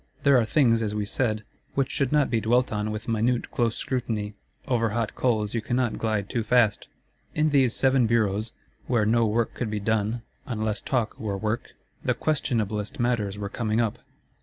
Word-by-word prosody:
There 140 Hz, -3 st, +6 dB
are 115 Hz, -, +2 dB
things, 115 Hz, -2 st, +3 dB
as 105 Hz, -1 st, -2 dB
we 105 Hz, -1 st, -1 dB
said, 110 Hz, 0 st, 0 dB, 0.3 s
which 135 Hz, -2 st, +1 dB
should 135 Hz, -3 st, 0 dB
not 150 Hz, -2 st, +3 dB
be 115 Hz, -2 st, +2 dB
dwelt 125 Hz, +3 st, +2 dB
on 105 Hz, 0 st, -1 dB
with 110 Hz, +1 st, -5 dB
minute 115 Hz, +2 st, 0 dB
close 120 Hz, 0 st, 0 dB
scrutiny: 115 Hz, -6 st, -2 dB, 0.3 s
over 115 Hz, -3 st, +2 dB
hot 115 Hz, -2 st, -1 dB
coals 110 Hz, -5 st, 0 dB
you 115 Hz, -, 0 dB
cannot 120 Hz, 0 st, -1 dB
glide 110 Hz, -3 st, 0 dB
too 120 Hz, 0 st, -1 dB
fast. 110 Hz, -2 st, +2 dB, 0.5 s
In 155 Hz, 0 st, +2 dB
these 130 Hz, -4 st, +3 dB
Seven 130 Hz, -3 st, +3 dB
Bureaus, 110 Hz, -1 st, +1 dB, 0.4 s
where 120 Hz, -4 st, +2 dB
no 115 Hz, +1 st, +3 dB
work 115 Hz, +2 st, 0 dB
could 120 Hz, -, -3 dB
be 105 Hz, 0 st, -2 dB
done, 110 Hz, +2 st, 0 dB, 0.2 s
unless 110 Hz, -3 st, -1 dB
talk 120 Hz, -5 st, -1 dB
were 100 Hz, -3 st, -2 dB
work, 110 Hz, +3 st, -3 dB, 0.3 s
the -, -, +1 dB
questionablest 110 Hz, -9 st, -1 dB
matters 115 Hz, -5 st, 0 dB
were 100 Hz, -1 st, -3 dB
coming 110 Hz, +1 st, -1 dB
up. 115 Hz, -3 st, 0 dB
115 Hz, 185 wpm, -26 LUFS, 105-125 Hz, 0.5 s, There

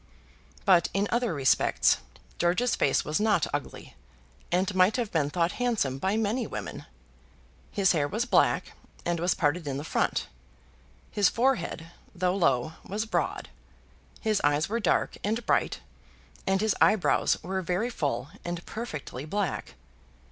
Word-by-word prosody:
But 180 Hz, -3 st, +5 dB
in 200 Hz, +1 st, +2 dB
other 240 Hz, -1 st, +1 dB
respects 140 Hz, -4 st, +3 dB, 0.4 s
George's 180 Hz, +8 st, +2 dB
face 135 Hz, -, +2 dB
was 150 Hz, +4 st, 0 dB
not 210 Hz, -5 st, +3 dB
ugly, 145 Hz, -1 st, -5 dB, 0.6 s
and 185 Hz, +3 st, +1 dB
might 185 Hz, +3 st, +4 dB
have 235 Hz, -4 st, -2 dB
been 150 Hz, -4 st, +1 dB
thought 170 Hz, +2 st, +1 dB
handsome 205 Hz, -, 0 dB
by 190 Hz, +7 st, 0 dB
many 225 Hz, +3 st, 0 dB
women. -, -, -6 dB, 0.9 s
His 195 Hz, -2 st, +3 dB
hair 150 Hz, -4 st, +1 dB
was 220 Hz, +9 st, -1 dB
black, -, -, +2 dB, 0.3 s
and 175 Hz, -1 st, 0 dB
was 175 Hz, +2 st, +1 dB
parted 165 Hz, -1 st, 0 dB
in 135 Hz, -1 st, -2 dB
the 145 Hz, -, -4 dB
front. -, -, 0 dB, 0.9 s
His 205 Hz, -3 st, +3 dB
forehead, 190 Hz, -9 st, 0 dB, 0.2 s
though 180 Hz, +1 st, +1 dB
low, 155 Hz, -5 st, +1 dB
was 210 Hz, +3 st, -3 dB
broad. 225 Hz, -, -2 dB, 0.7 s
His 215 Hz, -2 st, +1 dB
eyes 145 Hz, +1 st, +2 dB
were 230 Hz, +3 st, -1 dB
dark 215 Hz, -, +1 dB
and 225 Hz, +3 st, -1 dB
bright, -, -, +1 dB, 0.7 s
and 190 Hz, 0 st, +2 dB
his 220 Hz, -2 st, +2 dB
eyebrows 215 Hz, -4 st, +3 dB
were 190 Hz, +2 st, -2 dB
very 185 Hz, +7 st, -1 dB
full, 140 Hz, -, -2 dB
and 175 Hz, 0 st, -5 dB
perfectly 155 Hz, -, -6 dB
black. 190 Hz, -, -3 dB
185 Hz, 145 wpm, -28 LUFS, 155-215 Hz, 0.9 s, But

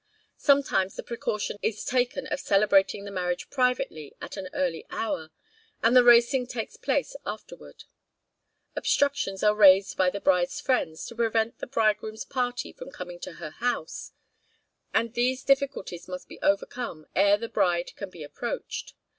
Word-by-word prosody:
Sometimes 275 Hz, -10 st, +3 dB
the -, -, -6 dB
precaution 215 Hz, -3 st, -3 dB
is 220 Hz, -1 st, -2 dB
taken 255 Hz, +2 st, 0 dB
of 260 Hz, -, -3 dB
celebrating 200 Hz, 0 st, +3 dB
the 200 Hz, -, -7 dB
marriage 180 Hz, -2 st, -3 dB
privately 250 Hz, -, -1 dB
at -, -, -7 dB
an 190 Hz, -2 st, -6 dB
early 175 Hz, -3 st, -1 dB
hour, 160 Hz, -8 st, -3 dB, 0.5 s
and 230 Hz, +2 st, +4 dB
the 250 Hz, -, +8 dB
racing 240 Hz, +2 st, +5 dB
takes 240 Hz, -3 st, -5 dB
place -, -, -1 dB
afterward. -, -, -8 dB, 0.9 s
Obstructions 280 Hz, -9 st, +1 dB
are 210 Hz, 0 st, +5 dB
raised 195 Hz, -2 st, +6 dB
by 185 Hz, -1 st, +4 dB
the 200 Hz, -, -5 dB
bride's 180 Hz, -2 st, +2 dB
friends, 160 Hz, -12 st, 0 dB
to -, -, -8 dB
prevent 225 Hz, 0 st, 0 dB
the -, -, -5 dB
bridegroom's 220 Hz, -1 st, 0 dB
party 250 Hz, -2 st, -2 dB
from -, -, -10 dB
coming 175 Hz, -1 st, -8 dB
to -, -, -7 dB
her 160 Hz, -2 st, -8 dB
house, 235 Hz, -5 st, -3 dB, 0.8 s
and 230 Hz, 0 st, +1 dB
these 255 Hz, +2 st, 0 dB
difficulties 275 Hz, -10 st, 0 dB
must 185 Hz, 0 st, -7 dB
be -, -, -12 dB
overcome 200 Hz, -4 st, -1 dB
ere 200 Hz, +1 st, +5 dB
the 230 Hz, +2 st, -5 dB
bride 175 Hz, -5 st, 0 dB
can 200 Hz, -, -6 dB
be 175 Hz, -4 st, -10 dB
approached. 145 Hz, 0 st, -5 dB
215 Hz, 155 wpm, -27 LUFS, 185-245 Hz, 0.9 s, the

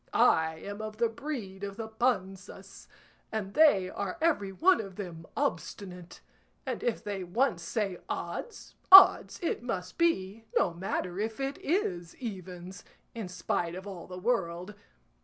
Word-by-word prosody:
I 160 Hz, 0 st, +4 dB
am 205 Hz, +6 st, -7 dB
of 215 Hz, 0 st, -6 dB
the 235 Hz, -, +2 dB
breed 225 Hz, -7 st, -6 dB
of 200 Hz, 0 st, -5 dB
the 225 Hz, -1 st, -4 dB
Panzas, 195 Hz, -4 st, -3 dB, 0.4 s
and 200 Hz, -3 st, -3 dB
they 290 Hz, -13 st, +5 dB
are 195 Hz, 0 st, -4 dB
every 295 Hz, -12 st, +1 dB
one 355 Hz, -, +4 dB
of 195 Hz, -3 st, -9 dB
them 170 Hz, -5 st, -7 dB
obstinate, 185 Hz, -10 st, -4 dB, 0.4 s
and 255 Hz, -3 st, -3 dB
if 240 Hz, -2 st, -1 dB
they 200 Hz, -2 st, -4 dB
once 200 Hz, +1 st, 0 dB
say 195 Hz, 0 st, -2 dB
'odds,' 480 Hz, -, -5 dB, 0.2 s
odds 385 Hz, 0 st, +9 dB
it 335 Hz, -, -1 dB
must 185 Hz, -7 st, -5 dB
be, 225 Hz, -, +1 dB
no 170 Hz, -, +2 dB
matter 180 Hz, +1 st, -3 dB
if 220 Hz, +2 st, -3 dB
it 275 Hz, +1 st, -3 dB
is 180 Hz, -, -1 dB
evens, 185 Hz, -5 st, -7 dB, 0.3 s
in 225 Hz, -5 st, -5 dB
spite 175 Hz, -1 st, -2 dB
of 190 Hz, +1 st, -8 dB
all 190 Hz, -4 st, -8 dB
the 180 Hz, -, -8 dB
world. 185 Hz, -3 st, -1 dB
200 Hz, 150 wpm, -30 LUFS, 180-235 Hz, 0.4 s, odds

